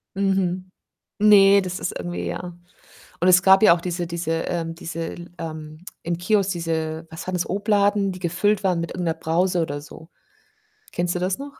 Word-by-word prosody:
Mhm. 190 Hz, -2 st, 0 dB, 0.6 s
Ne, 200 Hz, -1 st, +7 dB
das 185 Hz, 0 st, -5 dB
ist -, -, -3 dB
irgendwie, 175 Hz, 0 st, -5 dB
ja. 175 Hz, -1 st, -5 dB, 0.6 s
Und 180 Hz, -, +3 dB
es 185 Hz, +1 st, +6 dB
gab 190 Hz, +2 st, +6 dB
ja 170 Hz, -, +8 dB
auch 170 Hz, -, -7 dB
diese 175 Hz, -1 st, -3 dB
diese, 170 Hz, -1 st, -3 dB, 0.2 s
ähm 165 Hz, -2 st, -3 dB
diese, 165 Hz, 0 st, -5 dB, 0.2 s
ähm 155 Hz, 0 st, -8 dB, 0.2 s
im 170 Hz, 0 st, -2 dB
Kiosk 195 Hz, +1 st, +1 dB
diese 165 Hz, -1 st, -3 dB
was 160 Hz, +2 st, -9 dB
war 185 Hz, -, -3 dB
das? 180 Hz, -1 st, -2 dB
Obladen, 205 Hz, 0 st, +1 dB
die 185 Hz, -, -9 dB
gefüllt 190 Hz, +4 st, 0 dB
waren 180 Hz, -3 st, +1 dB
mit 170 Hz, -, -5 dB
irgendeiner 170 Hz, -3 st, -2 dB
Brause 175 Hz, +2 st, +1 dB
oder 145 Hz, -3 st, -3 dB
so. 160 Hz, +2 st, -13 dB, 0.8 s
Kennst 175 Hz, 0 st, -1 dB
du -, -, -1 dB
das 185 Hz, +1 st, -1 dB
noch? 280 Hz, 0 st, -9 dB
175 Hz, 180 wpm, -23 LUFS, 165-195 Hz, 0.8 s, ja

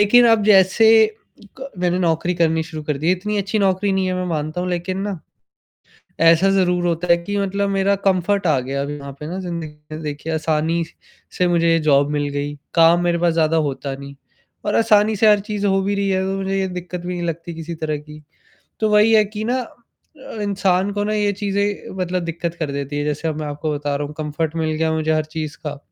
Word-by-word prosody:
लेकिन 240 Hz, +4 st, +6 dB
अब 225 Hz, -2 st, +4 dB
जैसे 200 Hz, +2 st, +5 dB, 0.7 s
क 270 Hz, +1 st, -7 dB
मैंने 180 Hz, 0 st, +1 dB
नौकरी 170 Hz, 0 st, 0 dB
करनी 160 Hz, -2 st, +1 dB
शुरू 160 Hz, -2 st, -7 dB
कर 150 Hz, -2 st, -2 dB
दी 155 Hz, -, -3 dB
है, 180 Hz, -, +5 dB
इतनी 210 Hz, +3 st, -2 dB
अच्छी 200 Hz, +2 st, -1 dB
नौकरी 195 Hz, 0 st, +1 dB
नहीं 190 Hz, -1 st, +1 dB
है 185 Hz, -, -1 dB
मैं 185 Hz, -, -2 dB
मानता 155 Hz, 0 st, -3 dB
हूँ 180 Hz, -, -2 dB
लेक़िन 180 Hz, +2 st, -2 dB
ना, 200 Hz, -2 st, -3 dB, 1.0 s
ऐसा 165 Hz, +3 st, +5 dB
ज़रूर 180 Hz, -2 st, +2 dB
होता 170 Hz, +1 st, -1 dB
है 170 Hz, 0 st, +5 dB
कि 170 Hz, +4 st, -5 dB
मतलब 200 Hz, 0 st, -1 dB
मेरा 195 Hz, 0 st, +2 dB
कम्फ़र्ट 195 Hz, +1 st, +2 dB
आ 150 Hz, -4 st, +3 dB
गया, 135 Hz, +2 st, -3 dB
अभी 140 Hz, +1 st, -3 dB
यहाँ 140 Hz, -1 st, -8 dB
पे 150 Hz, -, -6 dB
ना 180 Hz, +4 st, -4 dB
ज़िंदगी 170 Hz, -4 st, -5 dB, 0.2 s
में, 155 Hz, -, -6 dB
देखिए 150 Hz, +2 st, -4 dB
आसानी 160 Hz, +1 st, 0 dB, 0.5 s
से 180 Hz, -, +3 dB
मुझे 170 Hz, -1 st, +3 dB
जॉब 145 Hz, -2 st, +3 dB
मिल 145 Hz, -1 st, -1 dB
गई। 145 Hz, +1 st, -3 dB, 0.2 s
काम 170 Hz, +1 st, +5 dB
मेरे 175 Hz, -1 st, +1 dB
पास 170 Hz, -1 st, +2 dB
ज़्यादा 165 Hz, 0 st, +2 dB
होता 140 Hz, -2 st, -2 dB
नहीं 140 Hz, 0 st, -10 dB, 0.5 s
और 205 Hz, -, 0 dB
आसानी 215 Hz, -1 st, +4 dB
से 215 Hz, +2 st, +4 dB
हर 210 Hz, -, +5 dB
चीज़ 205 Hz, 0 st, -4 dB
हो 195 Hz, 0 st, +2 dB
भी 200 Hz, +1 st, 0 dB
रही 200 Hz, 0 st, 0 dB
है, 190 Hz, -1 st, +1 dB
तो 195 Hz, 0 st, -2 dB
मुझे 195 Hz, 0 st, -1 dB
ये 190 Hz, -, 0 dB
दिक़्क़त 180 Hz, -1 st, -6 dB
भी 180 Hz, +1 st, -4 dB
नहीं 175 Hz, -1 st, -3 dB
लगती 170 Hz, +1 st, -5 dB
किसी 165 Hz, +1 st, -6 dB
तरह 155 Hz, -1 st, -2 dB
की, 150 Hz, +1 st, -13 dB, 0.6 s
तो 220 Hz, -, +2 dB
वही 210 Hz, +2 st, +5 dB
है 215 Hz, -1 st, +6 dB
कि 210 Hz, +1 st, -6 dB
ना 245 Hz, +3 st, 0 dB
अ, 240 Hz, 0 st, -11 dB
इंसान 195 Hz, -1 st, +1 dB
को 205 Hz, 0 st, -1 dB
ना 215 Hz, -, -1 dB
ये 205 Hz, -1 st, +1 dB
चीज़ें 200 Hz, 0 st, -2 dB
मतलब 180 Hz, -1 st, -2 dB
दिक़्क़त 170 Hz, 0 st, -4 dB
कर 150 Hz, -3 st, -2 dB
देती 140 Hz, +1 st, -4 dB
है। 145 Hz, -, -1 dB
जैसे 150 Hz, +2 st, -2 dB
अब 155 Hz, -, -3 dB
मैं 150 Hz, -, -3 dB
आपको 150 Hz, +1 st, -3 dB
बता 145 Hz, 0 st, -2 dB
रहा 145 Hz, +1 st, -3 dB
हूँ 150 Hz, -, -10 dB
कम्फ़र्ट 155 Hz, +1 st, -3 dB
मिल 160 Hz, -1 st, 0 dB
गया 160 Hz, +1 st, +1 dB
है -, -, 0 dB
मुझे 160 Hz, 0 st, 0 dB
हर 155 Hz, 0 st, +1 dB
चीज़ 155 Hz, 0 st, -6 dB
का, 145 Hz, -1 st, -4 dB
175 Hz, 230 wpm, -20 LUFS, 155-195 Hz, 1.0 s, लेकिन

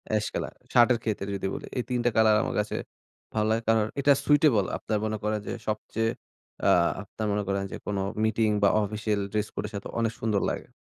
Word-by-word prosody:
এশ 105 Hz, -, +1 dB
কালার -, -, -3 dB, 0.2 s
শার্টের 120 Hz, -1 st, +5 dB
ক্ষেত্রে 100 Hz, -3 st, -2 dB
যদি 95 Hz, 0 st, -2 dB
বলি। -, -, -6 dB
এই 125 Hz, -, 0 dB
৩ 125 Hz, -1 st, 0 dB
টা -, -, +5 dB
কলার 110 Hz, -1 st, +5 dB
আমার -, -, -3 dB
কাছে 105 Hz, 0 st, -1 dB, 0.6 s
ভালো 110 Hz, 0 st, +2 dB
লাগে। 115 Hz, +1 st, +1 dB
কারণ 110 Hz, -1 st, +4 dB, 0.2 s
এটা 140 Hz, +1 st, +5 dB
সুইটেবল 145 Hz, -9 st, +4 dB
আপনার 110 Hz, -1 st, -2 dB
মনে 110 Hz, 0 st, -1 dB
করেন, 105 Hz, 0 st, 0 dB
যে, -, -, -2 dB
সবচেয়ে 110 Hz, +1 st, -1 dB, 0.6 s
আ -, -, +6 dB, 0.3 s
আপনার 110 Hz, -1 st, -5 dB
মনে 105 Hz, 0 st, 0 dB
করেন 100 Hz, 0 st, 0 dB
যে, -, -, -4 dB
কোন 105 Hz, -1 st, -2 dB, 0.3 s
মিটিং, 110 Hz, 0 st, +2 dB
বা 100 Hz, -, +7 dB
অফিসিয়াল 105 Hz, 0 st, -1 dB
ড্রেস 105 Hz, -1 st, 0 dB
কোডের 105 Hz, -, -4 dB
সাথে 100 Hz, -, -5 dB
অনেক 115 Hz, -1 st, +1 dB
সুন্দর 105 Hz, -4 st, +1 dB
লাগে। -, -, -4 dB
110 Hz, 205 wpm, -27 LUFS, 105-115 Hz, 0.6 s, বা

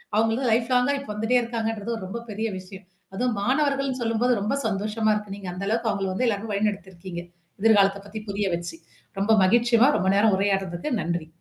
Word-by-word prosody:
அவுங்க 225 Hz, +1 st, +3 dB
வந்து 250 Hz, 0 st, 0 dB
லைஃப் 230 Hz, +2 st, +2 dB
லாங்கா 250 Hz, +3 st, +3 dB
இப்போ 275 Hz, -, -10 dB
வந்துட்டே 225 Hz, +4 st, +2 dB
இருக்காங்கன்றது, 225 Hz, -1 st, -3 dB
ஒரு 190 Hz, -, -6 dB
ரொம்ப 235 Hz, +4 st, -5 dB
பெரிய 220 Hz, +2 st, -2 dB
விஷயம். 190 Hz, 0 st, -12 dB, 0.3 s
அதுவும் 245 Hz, +2 st, 0 dB
மாணவர்கள்னு 275 Hz, +1 st, +1 dB
சொல்லும்போது 235 Hz, +2 st, +2 dB
ரொம்ப 215 Hz, +6 st, -1 dB
சந்தோஷமா 215 Hz, +1 st, 0 dB
இருக்கு. 210 Hz, -2 st, -5 dB
நீங்க 190 Hz, -3 st, -7 dB
அந்த 195 Hz, +2 st, -5 dB
அளவுக்கு 225 Hz, 0 st, 0 dB
அவுங்கள 195 Hz, -2 st, -2 dB
வந்து 250 Hz, +7 st, 0 dB
எல்லாரயும் 210 Hz, 0 st, -2 dB
வழி 210 Hz, +2 st, +2 dB
நடத்திருக்கீங்க. 190 Hz, -3 st, -8 dB, 0.4 s
எதிர்காலத்த 200 Hz, -3 st, +4 dB
பத்தி 215 Hz, +2 st, -6 dB
புரிய 200 Hz, 0 st, -1 dB
வச்சு. 170 Hz, -1 st, -6 dB, 0.4 s
ரொம்ப 205 Hz, +3 st, +1 dB
மகிழ்ச்சிம்மா, 235 Hz, +5 st, +4 dB
ரொம்ப 190 Hz, -, +1 dB
நேரம் 205 Hz, -1 st, +4 dB
உரையாடுறதுக்கு. 195 Hz, -, -1 dB
நன்றி. 170 Hz, -1 st, -2 dB
215 Hz, 185 wpm, -25 LUFS, 195-235 Hz, 0.4 s, எதிர்காலத்த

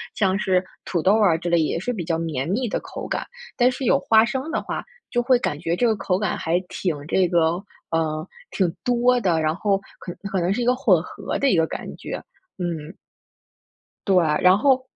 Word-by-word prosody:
像 195 Hz, -2 st, +2 dB
是 185 Hz, -2 st, +2 dB, 0.2 s
土 175 Hz, -, -1 dB
豆 190 Hz, +5 st, +4 dB
儿 195 Hz, -6 st, +4 dB
啊 -, -, -1 dB
之 175 Hz, +1 st, -6 dB
类， 170 Hz, 0 st, +3 dB
也 155 Hz, +1 st, 0 dB
是 245 Hz, +8 st, -2 dB
比 195 Hz, -7 st, -4 dB
较 165 Hz, 0 st, -1 dB
绵 160 Hz, -5 st, -2 dB
密 240 Hz, +6 st, 0 dB
的 -, -, -1 dB
口 -, -, -7 dB
感， -, -, -2 dB, 0.3 s
但 250 Hz, +1 st, +4 dB
是 260 Hz, +1 st, -5 dB
有 275 Hz, -, +4 dB
花 225 Hz, -5 st, +5 dB
生 265 Hz, +6 st, -3 dB
的 -, -, -1 dB
话 -, -, -4 dB, 0.3 s
就 240 Hz, -, +2 dB
会 255 Hz, 0 st, +4 dB
感 150 Hz, -10 st, -2 dB
觉 165 Hz, +1 st, -1 dB
这 240 Hz, +6 st, +2 dB
个 220 Hz, -, +2 dB
口 190 Hz, -2 st, 0 dB
感 205 Hz, -4 st, -1 dB
还 165 Hz, +2 st, 0 dB
挺 175 Hz, -5 st, -2 dB
这 185 Hz, +2 st, +2 dB
个 170 Hz, +2 st, +2 dB, 0.3 s
嗯， 155 Hz, -1 st, -1 dB, 0.3 s
挺 180 Hz, -4 st, 0 dB
多 245 Hz, 0 st, +3 dB
的， 175 Hz, -6 st, +2 dB
然 155 Hz, 0 st, +1 dB
后 195 Hz, +1 st, +1 dB, 0.2 s
可 180 Hz, -, -7 dB, 0.2 s
可 190 Hz, -, 0 dB
能 175 Hz, +2 st, +1 dB
是 245 Hz, -, -2 dB
一 -, -, 0 dB
个 250 Hz, +1 st, +3 dB
混 185 Hz, -9 st, +3 dB
合 -, -, -5 dB
的 275 Hz, -, +3 dB
一 -, -, +3 dB
个 165 Hz, 0 st, +3 dB
感 -, -, -6 dB
觉， -, -, -5 dB, 0.4 s
嗯。 170 Hz, -2 st, -4 dB, 1.1 s
对， 195 Hz, -, +4 dB, 0.3 s
然 185 Hz, +1 st, +6 dB
后 260 Hz, +2 st, +3 dB
185 Hz, 235 characters per minute, -23 LUFS, 165-240 Hz, 1.1 s, 然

